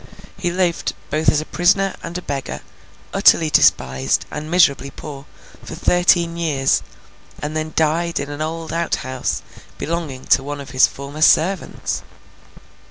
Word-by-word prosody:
He 190 Hz, -3 st, -2 dB
lived, 175 Hz, -1 st, 0 dB, 0.2 s
both 155 Hz, +2 st, +2 dB
as 150 Hz, -, +2 dB
a -, -, -7 dB
prisoner 195 Hz, +3 st, +2 dB
and 170 Hz, +1 st, -5 dB
a 180 Hz, -, -7 dB
beggar, 140 Hz, -2 st, -4 dB, 0.5 s
utterly 160 Hz, -2 st, +5 dB
despised, 65 Hz, -, +3 dB
and 150 Hz, +1 st, -6 dB
miserably 140 Hz, -6 st, +3 dB
poor, 140 Hz, 0 st, -9 dB, 0.4 s
for -, -, -8 dB
thirteen 175 Hz, -1 st, +2 dB
years, 145 Hz, -5 st, +1 dB, 0.6 s
and 150 Hz, +2 st, -4 dB
then 155 Hz, 0 st, -3 dB
died 165 Hz, +2 st, +1 dB
in 145 Hz, -, -4 dB
an 145 Hz, +1 st, -6 dB
old 160 Hz, 0 st, -4 dB
outhouse 130 Hz, -6 st, -2 dB, 0.3 s
belonging 155 Hz, -5 st, -4 dB
to -, -, +4 dB
one 145 Hz, +1 st, -5 dB
of 140 Hz, -3 st, -9 dB
his 130 Hz, -1 st, +5 dB
former 140 Hz, +3 st, -8 dB
servants. 175 Hz, +3 st, +2 dB
155 Hz, 145 wpm, -20 LUFS, 140-170 Hz, 0.6 s, utterly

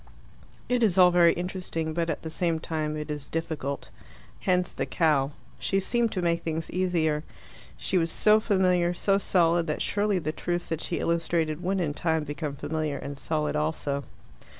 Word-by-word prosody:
It 250 Hz, -1 st, +1 dB
is 200 Hz, -5 st, +3 dB
all 180 Hz, -1 st, +7 dB
very 175 Hz, -1 st, +6 dB
interesting, 175 Hz, -3 st, -3 dB
but 170 Hz, 0 st, -1 dB
at 160 Hz, -, -3 dB
the 160 Hz, -, -5 dB
same 165 Hz, -1 st, 0 dB
time 155 Hz, -1 st, -2 dB
it 150 Hz, 0 st, -4 dB
is 145 Hz, -2 st, -5 dB
difficult. 155 Hz, -4 st, -3 dB, 0.5 s
Hence 180 Hz, -1 st, +1 dB
the -, -, -3 dB
cow. 150 Hz, -5 st, +2 dB, 0.3 s
She 195 Hz, -, +1 dB
seemed 235 Hz, +3 st, +1 dB
to 185 Hz, -, -2 dB
make 170 Hz, -1 st, +1 dB
things 160 Hz, 0 st, -3 dB
easier. 165 Hz, -4 st, +1 dB, 0.5 s
She 185 Hz, -, +1 dB
was 165 Hz, 0 st, 0 dB
so 215 Hz, 0 st, +5 dB
familiar, 180 Hz, -4 st, +2 dB
so 195 Hz, +2 st, +2 dB
solid, 170 Hz, -3 st, +3 dB
that 150 Hz, -, -1 dB
surely 205 Hz, -1 st, +1 dB
the 155 Hz, -3 st, -2 dB
truths 175 Hz, +2 st, -3 dB
that 165 Hz, -1 st, -2 dB
she 170 Hz, -, -2 dB
illustrated 165 Hz, -1 st, 0 dB
would 190 Hz, +2 st, 0 dB
in 155 Hz, -5 st, 0 dB
time 160 Hz, 0 st, 0 dB
become 145 Hz, 0 st, -4 dB
familiar 150 Hz, +1 st, -2 dB
and 140 Hz, 0 st, -6 dB
solid 150 Hz, +2 st, -2 dB
also. 150 Hz, -2 st, -1 dB
165 Hz, 175 wpm, -27 LUFS, 155-180 Hz, 0.5 s, all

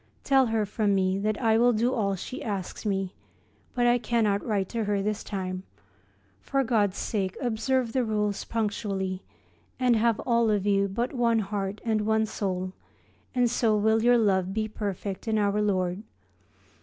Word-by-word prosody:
Tell 270 Hz, -2 st, +4 dB
her 220 Hz, -1 st, 0 dB
from 205 Hz, 0 st, 0 dB
me 190 Hz, 0 st, +1 dB
that 215 Hz, +1 st, -1 dB
I 225 Hz, -2 st, +3 dB
will 245 Hz, +1 st, +5 dB
do 235 Hz, +4 st, +1 dB
all 200 Hz, -4 st, 0 dB
she 225 Hz, +7 st, -7 dB
asks 200 Hz, 0 st, -4 dB
me, 195 Hz, -2 st, -1 dB, 0.6 s
but 245 Hz, -1 st, +2 dB
I 240 Hz, 0 st, +4 dB
cannot 220 Hz, -4 st, +1 dB
write 200 Hz, -4 st, 0 dB
to 230 Hz, -2 st, -2 dB
her 205 Hz, -1 st, 0 dB
this 210 Hz, +1 st, -2 dB
time. 185 Hz, -2 st, -4 dB, 0.8 s
For 270 Hz, -, 0 dB
God's 210 Hz, -6 st, +1 dB
sake 190 Hz, -4 st, -2 dB
observe 245 Hz, 0 st, 0 dB
the 260 Hz, -, +2 dB
rules 210 Hz, -2 st, -1 dB
punctually, 200 Hz, -4 st, -2 dB, 0.6 s
and 250 Hz, -2 st, +3 dB
have 225 Hz, 0 st, +2 dB
all 235 Hz, -2 st, +2 dB
of 205 Hz, -2 st, +1 dB
you 200 Hz, -1 st, +3 dB
but 235 Hz, +7 st, -2 dB
one 235 Hz, -3 st, +2 dB
heart 200 Hz, -1 st, -3 dB
and 220 Hz, -2 st, +1 dB
one 220 Hz, +1 st, +2 dB
soul, 185 Hz, -3 st, -3 dB, 0.6 s
and 245 Hz, -1 st, +3 dB
so 225 Hz, -2 st, +2 dB
will 220 Hz, +1 st, +3 dB
your 240 Hz, +1 st, +5 dB
love 190 Hz, -3 st, +1 dB
be 215 Hz, 0 st, 0 dB
perfect 200 Hz, -1 st, -5 dB
in 220 Hz, -1 st, +1 dB
Our 205 Hz, 0 st, +1 dB
Lord. 185 Hz, -2 st, 0 dB
215 Hz, 170 wpm, -27 LUFS, 195-230 Hz, 0.8 s, will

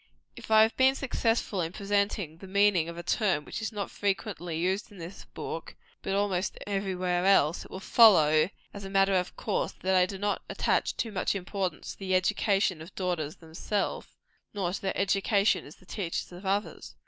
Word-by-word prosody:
If -, -, -11 dB
I 220 Hz, 0 st, +7 dB
have 220 Hz, -, +1 dB
been 265 Hz, +1 st, +4 dB
successful 230 Hz, -7 st, 0 dB
in 165 Hz, +1 st, -3 dB
presenting 200 Hz, -5 st, -1 dB
the 195 Hz, -, -11 dB
meaning 195 Hz, -4 st, +3 dB
of 170 Hz, -, -8 dB
a 170 Hz, -, -6 dB
term 185 Hz, -5 st, +1 dB
which -, -, -5 dB
is 220 Hz, -, -3 dB
not 210 Hz, -2 st, -4 dB
only -, -, -4 dB
frequently 195 Hz, -4 st, -2 dB
used 190 Hz, +6 st, -1 dB
in 205 Hz, -, -13 dB
this 175 Hz, +3 st, -9 dB
book, -, -, -7 dB, 0.3 s
but 195 Hz, -, -2 dB
almost 200 Hz, -2 st, 0 dB
every 195 Hz, -2 st, -2 dB
where 180 Hz, -1 st, 0 dB
else, 180 Hz, -5 st, +3 dB
it -, -, -14 dB
will 190 Hz, -, -7 dB
follow, 170 Hz, -8 st, +6 dB, 0.2 s
as 200 Hz, -, -8 dB
a 195 Hz, -, -6 dB
matter 195 Hz, 0 st, +3 dB
of 180 Hz, -1 st, 0 dB
course, 210 Hz, -, -1 dB
that 190 Hz, +1 st, +1 dB
I 185 Hz, -1 st, +4 dB
do 195 Hz, -, -6 dB
not 205 Hz, +1 st, -1 dB
attach -, -, 0 dB
too 230 Hz, -, -2 dB
much 195 Hz, 0 st, -1 dB
importance 190 Hz, -2 st, -3 dB
to -, -, -13 dB
the 190 Hz, -1 st, 0 dB
education 195 Hz, -2 st, +1 dB
of 165 Hz, +4 st, -11 dB
daughters 175 Hz, -4 st, -2 dB
themselves, 170 Hz, +5 st, -3 dB, 0.5 s
nor 180 Hz, -3 st, -1 dB
to -, -, -4 dB
their 195 Hz, -, -2 dB
education 200 Hz, 0 st, +2 dB
as 145 Hz, -, -13 dB
the -, -, -22 dB
teachers 180 Hz, -3 st, -4 dB
of 180 Hz, +2 st, -8 dB
others. 200 Hz, +2 st, -2 dB
195 Hz, 200 wpm, -28 LUFS, 180-205 Hz, 0.5 s, I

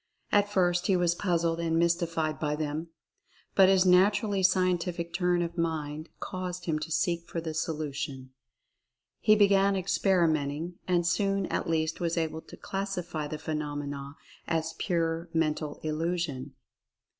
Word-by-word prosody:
At 205 Hz, 0 st, +4 dB
first 180 Hz, -2 st, +2 dB
he 195 Hz, -, +4 dB
was 175 Hz, -1 st, +2 dB
puzzled 170 Hz, -2 st, 0 dB
and 165 Hz, -1 st, 0 dB
mystified 165 Hz, -2 st, +1 dB
by 150 Hz, -1 st, 0 dB
them, 155 Hz, +2 st, -3 dB, 0.7 s
but 190 Hz, -1 st, +6 dB
his 190 Hz, -1 st, +4 dB
naturally 195 Hz, +2 st, +4 dB
scien 185 Hz, -1 st, +3 dB
tific 170 Hz, -1 st, -4 dB
turn 180 Hz, -1 st, +2 dB
of 170 Hz, 0 st, -5 dB
mind 155 Hz, -1 st, -2 dB
caused 180 Hz, -1 st, -5 dB
him 155 Hz, -3 st, 0 dB
to 155 Hz, -, -5 dB
seek 170 Hz, +1 st, 0 dB
for 170 Hz, -, -3 dB
the 160 Hz, -1 st, -4 dB
solution. 145 Hz, -4 st, -4 dB, 0.9 s
He 215 Hz, -, +5 dB
began 200 Hz, -1 st, +4 dB
experimenting, 170 Hz, -4 st, +1 dB
and 175 Hz, -2 st, +2 dB
soon 195 Hz, +2 st, +1 dB
at -, -, -1 dB
least 160 Hz, -1 st, 0 dB
was 170 Hz, -1 st, -1 dB
able 160 Hz, -1 st, -1 dB
to -, -, -13 dB
classify 180 Hz, -6 st, -3 dB
the 155 Hz, -, -5 dB
phenomena 145 Hz, -2 st, -4 dB, 0.3 s
as 165 Hz, -1 st, -1 dB
pure 165 Hz, -1 st, -1 dB
Mental 155 Hz, -2 st, 0 dB
Illusion. 155 Hz, -4 st, -2 dB
170 Hz, 145 wpm, -29 LUFS, 155-180 Hz, 0.9 s, but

